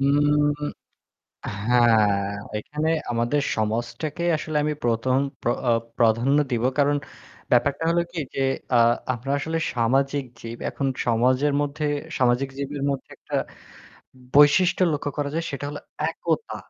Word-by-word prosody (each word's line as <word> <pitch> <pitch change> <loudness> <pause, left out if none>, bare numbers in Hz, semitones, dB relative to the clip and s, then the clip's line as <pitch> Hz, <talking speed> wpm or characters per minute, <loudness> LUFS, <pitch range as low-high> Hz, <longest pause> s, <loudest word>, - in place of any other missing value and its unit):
উম 145 +1 +3 1.2
হ্যাঁ, 110 -5 +4 0.3
এখানে 150 +8 -2 0.2
আমাদের 120 +5 +1
সমাজটাকে 120 +9 -2
আসলে 155 0 -3
আমি 150 0 0
১ম 120 +3 +1 0.2
প্র - - 0 0.2
আ - - +5 0.3
প্রাধান্য 120 +4 +3
দিব। 120 -1 0 0.2
কারণ 145 0 +3 0.6
ব্যাপারটা 140 +5 +2
হলো 170 +1 +3
কি 175 - -4 0.2
যে - - -1 0.3
আ - - +6 0.4
আমরা 130 +3 -4
আসলে 160 +3 -2 0.2
সামাজিক 135 +4 +1 0.2
জীব 115 0 -7
এখন 140 - -2 0.2
সমাজের 130 +5 +2
মধ্যে 145 +1 -2 0.3
সামাজিক 125 +1 +2
জীবের 140 0 -4
মধ্যে 135 -1 -5
একটা - - -6 1.0
বৈশিষ্ট্য 150 +6 +5
লক্ষ্য 145 0 -2
করা 145 -1 -1
যায় 165 - -1
সেটা 140 0 -5
হল 145 - -6 0.3
একতা। 460 - -2
140 Hz, 130 wpm, -24 LUFS, 120-145 Hz, 1.2 s, আ